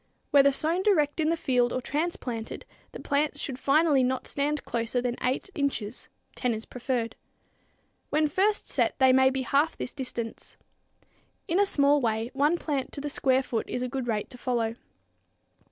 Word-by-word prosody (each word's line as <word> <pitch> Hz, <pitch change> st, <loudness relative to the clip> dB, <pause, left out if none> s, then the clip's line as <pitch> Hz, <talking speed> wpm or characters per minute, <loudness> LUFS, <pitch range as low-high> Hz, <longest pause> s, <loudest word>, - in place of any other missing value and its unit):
Whether 280 Hz, -1 st, +6 dB
sown 320 Hz, +6 st, 0 dB
direct 325 Hz, -7 st, +2 dB
in 315 Hz, 0 st, +2 dB
the 335 Hz, -, +1 dB
field 250 Hz, -5 st, +1 dB
or -, -, -1 dB
transplanted 255 Hz, -5 st, -3 dB, 0.3 s
the -, -, -9 dB
plants 290 Hz, +1 st, 0 dB
should 265 Hz, -3 st, -4 dB
finally 290 Hz, 0 st, +4 dB
not 255 Hz, +1 st, -1 dB
stand 290 Hz, +1 st, -1 dB
closer 235 Hz, +1 st, -1 dB
than 245 Hz, -1 st, -1 dB
8 260 Hz, +10 st, -1 dB
inches 275 Hz, -, -3 dB, 0.3 s
10 245 Hz, -2 st, 0 dB
is 220 Hz, -, -7 dB
preferred. 240 Hz, -2 st, -3 dB, 0.9 s
When 305 Hz, +1 st, +2 dB
first 410 Hz, +7 st, +1 dB
set -, -, 0 dB
they 260 Hz, -1 st, +5 dB
may 265 Hz, 0 st, +6 dB
be 265 Hz, 0 st, -2 dB
half 285 Hz, +6 st, +1 dB
this -, -, -5 dB
distance. 240 Hz, -4 st, -6 dB, 0.9 s
In 345 Hz, +4 st, +1 dB
a 405 Hz, -, +4 dB
small 285 Hz, -3 st, +4 dB
way 225 Hz, 0 st, -1 dB
one 295 Hz, +5 st, +2 dB
plant 280 Hz, -6 st, -2 dB
to -, -, -5 dB
the 295 Hz, 0 st, -3 dB
square 265 Hz, -1 st, +2 dB
foot 230 Hz, -3 st, -3 dB
is 250 Hz, -, -2 dB
a -, -, -1 dB
good 260 Hz, -1 st, -4 dB
rate 215 Hz, -3 st, -2 dB
to 250 Hz, -, -11 dB
follow. 235 Hz, -3 st, 0 dB
270 Hz, 175 wpm, -27 LUFS, 245-295 Hz, 0.9 s, Whether